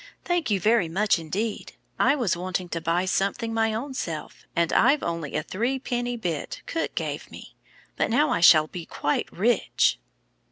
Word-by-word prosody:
"Thank 350 -5 0
you 200 -2 +2
very 210 -3 +3
much 195 +2 +2
indeed. 200 +8 -4 0.3
I 280 - +4
was 235 - 0
wanting 180 0 -3
to 165 - -3
buy 170 +3 +1
something 200 +4 -1
my 225 0 +2
own 250 +6 -4
self, 160 -11 -6
and 170 -1 +1
I've 280 +5 +4
only 165 -4 -3
a 150 +1 -1
little 240 - -2 0.2
cook 330 - -3
gave - - -3
me, - - -12 0.4
but - - +1
now 295 +7 +3
I - - +1
shall 160 -2 +7
be 165 +1 -8
quite 150 - -1
rich." 210 - +2
195 Hz, 165 wpm, -25 LUFS, 170-240 Hz, 0.4 s, shall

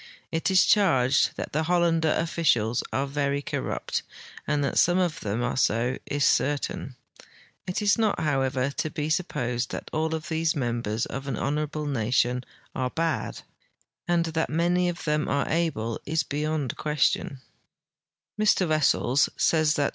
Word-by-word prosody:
It 165 +2 0
is 190 -1 +5
cliarged 135 -10 +3
that - - -6
the 155 - +1
Hollander 165 -1 +2
officials 125 -9 +1
are 135 - 0
very 140 0 -1
corrupt, - - -3 0.5
and 150 -1 +1
that 140 - +1
some 175 +1 +4
of 180 -4 0
them 110 +3 -2
are 125 - -1
so 120 0 +1
is 145 -1 +1
certain. 140 -1 0 0.7
It 185 +3 -2
is 205 +1 +3
not, 215 -2 +1
however, 135 -3 0
to 155 - -2
be 150 +1 -3
su[) 160 - +3
posed 120 -7 -3
that - - -6
all 160 +1 0
of 160 +1 -6
these 160 -1 0
members 120 -4 -1
of 135 +1 -6
an 130 -5 -2
honorable 150 +1 -2
nation 125 -1 +1 0.3
are 130 -1 -1
bad,t 165 +3 -2 0.6
and 170 -1 +2
that 160 0 0
many 175 +3 +2
of 175 0 -5
them 150 -1 0
are 140 0 0
able 155 -10 -1
is 160 +2 +1
be3"ond 150 -2 -2
question. 150 -2 0
150 Hz, 145 wpm, -26 LUFS, 130-165 Hz, 0.7 s, is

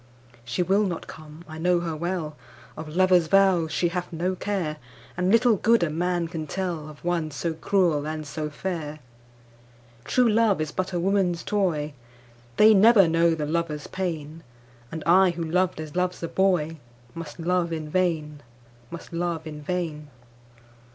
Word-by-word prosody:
She 120 +9 -1
will 195 +4 +2
not 180 -5 -3
come, 155 +2 -12
I 155 0 -8
know 175 +1 +2
her 165 -2 -3
well, 170 -2 -3 0.4
Of 155 0 -7
lover's 180 -2 +4
vows 185 -3 +3
she 175 +3 +1
hath 180 0 -4
no 175 +3 -1
care, 180 -6 -2 0.4
And 180 +1 +1
little 230 -1 +4
good 230 -1 +3
a 160 - 0
man 175 +1 -1
can 160 -2 -5
tellOf 160 -4 -4
one 170 -3 -1
so 160 +3 -3
cruel 160 -3 +1
and 155 0 -4
so 150 +1 -4
fair. 155 -1 -5 1.1
True 250 - +2
love 220 -3 +3
is 155 -1 -2
but 185 +3 -3
a 175 - -1
woman's 180 -2 +1
toy, 165 -8 -1 0.6
They 215 +1 +7
never 210 -1 +6
know 165 0 +3
the 150 -2 -3
lover's 155 -1 -2
pain, 165 -4 -4 0.5
And 160 -1 -5
I 185 +3 +6
who 170 -1 -3
loved 180 +1 0
as 155 0 -7
loves 180 -1 -1
a - - -1
boyMust 155 -6 -2
love 175 0 0
in 160 -2 -4
vain, 155 -4 -1 0.5
must 170 +1 -10
love 170 -1 -2
in 150 -1 -7
vain. 155 -2 -3
170 Hz, 160 wpm, -25 LUFS, 155-185 Hz, 1.1 s, They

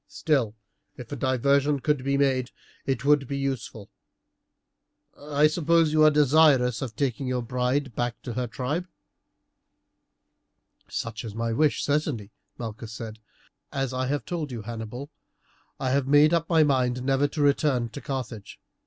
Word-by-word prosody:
Still, 130 -9 0 0.4
if 120 -3 -10
a - - -3
diversion 140 +3 +2
could 145 -1 0
be 140 +1 +1
made 130 -3 +1 0.4
it 135 -1 -1
would 145 -2 +4
be 140 - -3
useful. 135 -6 -4 1.2
I 145 0 +1
suppose 165 0 +3
you 155 0 +5
are 155 - +8
desirous 145 -5 +4
of 120 -5 -5
taking 135 +1 -1
your 125 -1 -1
bride 125 +2 -1
back 120 -1 -2
to 120 - -5
her 125 +1 -2
tribe." 145 +10 -3 2.0
"Such 115 0 -4
is 110 -3 -7
my 115 0 -1
wish, 150 +4 +2
certainly," 140 -8 -1 0.3
Malchus 115 -1 -7
said. 110 0 -7 0.5
"As 135 -2 -2
I 130 0 -1
have 145 +2 -2
told 165 -6 -4
you, 115 -3 -6
Hannibal, 120 +4 -7 0.7
I 130 -1 -1
have 135 0 +1
made 145 +3 +5
up 165 -1 +1
my 165 -2 +5
mind 125 -3 +1
never 135 +2 +2
to 150 +1 -4
return 140 -4 +2
to 145 - -8
Carthage. 125 -7 -6
135 Hz, 155 wpm, -26 LUFS, 120-145 Hz, 2.0 s, are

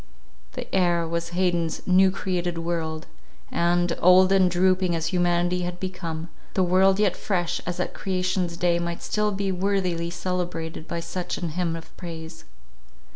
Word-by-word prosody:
The - - -5
air 175 -3 +2
was 170 0 -2
Haydn's 175 -2 0
"New 190 +1 +5
Created 180 -3 -2
World," 165 -2 -3 0.5
and, 175 0 +2
old 185 +1 +6
and 190 -2 +5
drooping 185 0 +2
as 165 +2 -2
humanity 175 0 +2
had 175 0 -4
become, 170 -3 -5 0.3
the 190 - +3
world 190 +2 +4
yet 205 -4 +3
fresh 175 -4 -1
as 180 0 -3
at 180 - -2
creation's 185 -2 -1
day, 175 -1 +2
might 170 0 -4
still 210 0 0
be 195 -1 -1
worthily 180 -3 0
celebrated 175 -2 -3
by 170 0 -3
such 175 +1 -4
an 170 - -3
hymn 170 0 -1
of 165 0 -10
praise. 160 -2 -8
175 Hz, 155 wpm, -25 LUFS, 170-185 Hz, 0.5 s, old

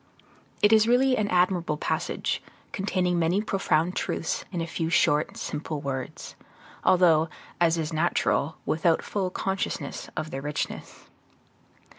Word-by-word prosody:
It 210 +1 +6
is 220 0 +5
a - - +1
really 255 +2 +4
admirable 180 -6 +1
passage, - - -2 0.3
containing 180 -3 0
many 170 +4 +2
profound 185 -5 0
truths 165 - -2
in 180 - -3
a 165 - -1
few 165 -1 -3
short, 150 -3 +2
simple 150 0 -4
words, 135 -2 -5 0.5
although, 165 -3 +4 0.3
as 170 -1 +3
is 160 0 -2
natural, 160 -2 +1
without 165 +1 +2
full 195 -3 -2
consciousness 190 +1 -3
of 155 -1 -3
their 135 - -4
richness. 150 +1 -5
170 Hz, 130 wpm, -26 LUFS, 155-190 Hz, 0.5 s, It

